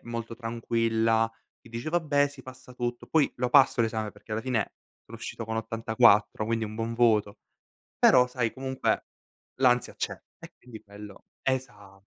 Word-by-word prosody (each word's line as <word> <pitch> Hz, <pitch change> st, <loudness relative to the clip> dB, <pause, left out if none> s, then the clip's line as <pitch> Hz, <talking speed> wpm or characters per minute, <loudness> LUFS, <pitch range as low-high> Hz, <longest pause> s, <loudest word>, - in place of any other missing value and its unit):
molto 115 Hz, -1 st, -5 dB
tranquilla, 115 Hz, -1 st, +1 dB, 0.3 s
che -, -, -17 dB
dice: 115 Hz, +6 st, -5 dB
"Vabbè 145 Hz, -4 st, +2 dB
sì, 140 Hz, -2 st, -13 dB
passa 130 Hz, -1 st, -13 dB
tutto." 120 Hz, 0 st, -4 dB
Poi 155 Hz, -3 st, +2 dB
lo 125 Hz, 0 st, 0 dB
passo 135 Hz, -2 st, +5 dB
l'esame 110 Hz, -2 st, -1 dB
perché -, -, -20 dB
alla 110 Hz, +1 st, -1 dB
fine 125 Hz, -5 st, -1 dB, 0.3 s
sono -, -, -11 dB
uscito 115 Hz, -, -6 dB
con 110 Hz, 0 st, -4 dB
84, 110 Hz, -1 st, +3 dB
quindi 115 Hz, -1 st, 0 dB
un 110 Hz, 0 st, -7 dB
buon 115 Hz, 0 st, -3 dB
voto; 110 Hz, -4 st, +2 dB, 0.6 s
però 125 Hz, -1 st, +6 dB
sai 125 Hz, -3 st, -2 dB
comunque 130 Hz, 0 st, -1 dB, 0.6 s
l'ansia 125 Hz, -1 st, +3 dB
c'è -, -, -2 dB, 0.3 s
e -, -, -12 dB
quindi 115 Hz, -3 st, -12 dB
quello 100 Hz, -1 st, -12 dB, 0.2 s
esatto. 105 Hz, -7 st, -4 dB
115 Hz, 160 wpm, -27 LUFS, 110-125 Hz, 0.6 s, però